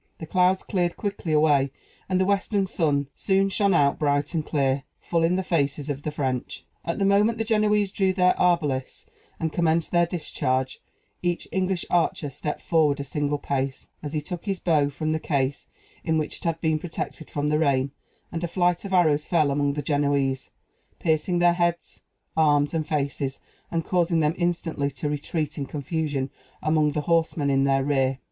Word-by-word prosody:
The 160 - -7
clouds 185 +3 +2
cleared 175 -3 -1
quickly 200 -5 -3
away, 150 -3 +4 0.4
and 185 -1 +2
the 190 - +3
western 200 0 +1
sun 145 -6 0
soon 195 0 +2
shone 200 -1 +2
out 140 -3 +3
bright 145 +1 +1
and 160 -2 0
clear, 140 -3 0 0.2
full 170 -1 -1
in 170 +2 +3
the 190 - 0
faces 145 -4 0
of 140 0 -5
the 150 - -3
French. 130 -4 -3 0.2
At 170 - -2
the 195 - +1
moment 205 +3 +3
the 225 - 0
Genoese 210 -2 +2
drew 195 -2 +2
their 180 -1 +3
arbalists, 150 -7 0 0.3
and 160 -1 -2
commenced 165 -1 +1
their 175 -1 +3
discharge, 130 -6 -2 0.4
each 175 -1 -1
English 185 -1 0
archer 165 -4 +1
stepped 150 +2 -4
forward 155 -4 +2
a - - -2
single 145 +1 -1
pace, 135 -1 -3
as 150 0 -6
he 155 - 0
took 175 +5 -6
his 195 -2 -1
bow 150 -5 +2
from 155 +2 -3
the 160 - 0
case 140 -3 -1 0.4
in 160 -2 +1
which 155 - -2
it - - -12
had 165 -1 0
been 160 -2 +1
protected 160 -1 -6
from 145 0 -1
the 150 0 +2
rain; 140 -3 +2 0.4
and 170 0 -4
a - - 0
flight 175 0 +1
of 195 -1 -5
arrows 155 -5 +3
fell 155 -5 +2
among 145 0 +1
the 145 0 -3
Genoese, 140 -2 0 0.5
piercing 160 +2 +1
their 175 0 +5
heads, 170 0 -1 0.3
arms, 145 -2 +3
and 160 -2 -1
faces, 140 -2 -2 0.3
and 165 -1 -2
causing 175 -2 +2
them 150 0 +2
instantly 170 -5 -1
to 140 +1 -4
retreat 150 +1 -2
in 140 - -3
confusion 145 -2 -2 0.3
among 155 -1 +2
the 150 - -1
horsemen 160 -2 +1
in 135 0 +3
their 135 0 +2
rear. 135 -2 +1
155 Hz, 185 wpm, -25 LUFS, 145-175 Hz, 0.5 s, their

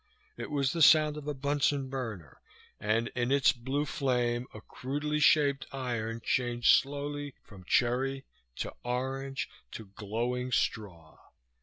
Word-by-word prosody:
It - - -6
was 140 -3 +1
the 165 - -2
sound 155 0 +6
of 150 -1 -8
a 150 - -1
Bunsen 140 0 0
burner, 115 - -6 0.4
and 115 +3 0
in 125 +1 -1
its 140 -1 +5
blue 135 +4 -2
flame 125 -3 0
a 110 - -9
crudely 145 +7 -3
shaped 145 -1 +4
iron 115 -4 -3
changed 120 -2 +4
slowly 145 0 -5
from 95 -4 -14
cherry 130 +5 +1 0.3
to - - -4
orange 135 +2 -2 0.3
to 110 - -7
glowing 120 +5 -2
straw. 85 -10 -2
130 Hz, 135 wpm, -30 LUFS, 120-140 Hz, 0.4 s, sound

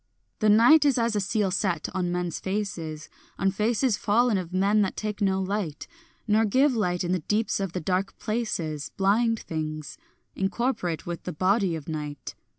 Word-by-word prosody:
The 215 - +3
night 235 +9 +7
is 280 -3 +3
as 230 -2 +1
a - - +2
seal 200 0 0
set 185 -4 0
on 180 -2 -1
men's 175 -1 -2
faces, 175 -6 -4 0.3
On 195 0 +1
faces 220 +3 +1
fallen 225 +3 +2
of 180 -3 -3
men 200 +3 +3
that 195 - -1
take 215 0 -4
no 190 -1 +2
light, 190 -5 -3 0.4
Nor 215 +1 +4
give 260 +6 +3
light 180 -5 0
in 175 - -1
the 185 - +1
deeps 210 +8 0
of 195 -3 -3
the 180 - -3
dark 185 +4 -1
places, 175 -10 -3
Blind 220 +4 +2
things, 155 -1 -5 0.4
incorporate 195 - -1
with 175 -1 -5
the - - -4
body 185 +2 +1
of 155 -3 -8
night. 150 -2 -5
195 Hz, 175 wpm, -26 LUFS, 175-215 Hz, 0.4 s, night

